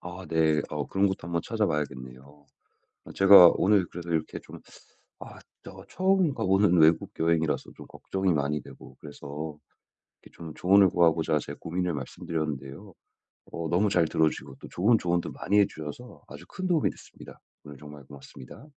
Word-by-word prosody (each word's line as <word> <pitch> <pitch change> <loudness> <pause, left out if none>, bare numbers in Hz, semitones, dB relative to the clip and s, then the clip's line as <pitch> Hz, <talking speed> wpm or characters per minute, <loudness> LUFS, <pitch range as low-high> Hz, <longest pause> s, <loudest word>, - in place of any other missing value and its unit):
아, 90 +1 -9
네. 80 -2 +2
어, 75 -2 -4
그런 95 +1 +1
것도 95 - -3
한번 85 0 -3
찾아봐야겠네요. 70 - -3 0.9
어, - - -11
제가 95 -3 +8
오늘 100 -2 +2
그래도 85 0 -9
이렇게 80 -1 -2
좀 - - -13 0.6
아, - - -11 0.3
저 - - -12
처음 185 -4 +1
가보는 95 -4 +2
외국 80 +1 +3
여행이라서 80 -2 0
좀 - - -12
걱정이 95 -2 -2
많이 75 0 -1
되고, - - -15
그래서 75 +1 -8 0.7
이렇게 - - -19
좀 80 -2 -9
조언을 95 +1 +4
구하고자 80 -3 +2
제 - - -8
고민을 90 +1 -4
말씀드렸는데요. 75 +3 -6 0.6
어, 85 -1 -5
너무 95 +5 +1
잘 90 -4 +2
들어 80 0 +2
주시고 65 - -10
또 - - -10
좋은 110 +6 +2
조언도 85 -3 -2
많이 105 +1 0
해 100 - +5
주셔서 80 +11 -10
아주 - - -12
큰 185 -1 -5
도움이 170 -5 +1
됐습니다. - - -15 0.2
오늘 70 -1 -12
정말 75 0 -12
고맙습니다. 70 - -13
85 Hz, 365 characters per minute, -26 LUFS, 75-95 Hz, 0.9 s, 제가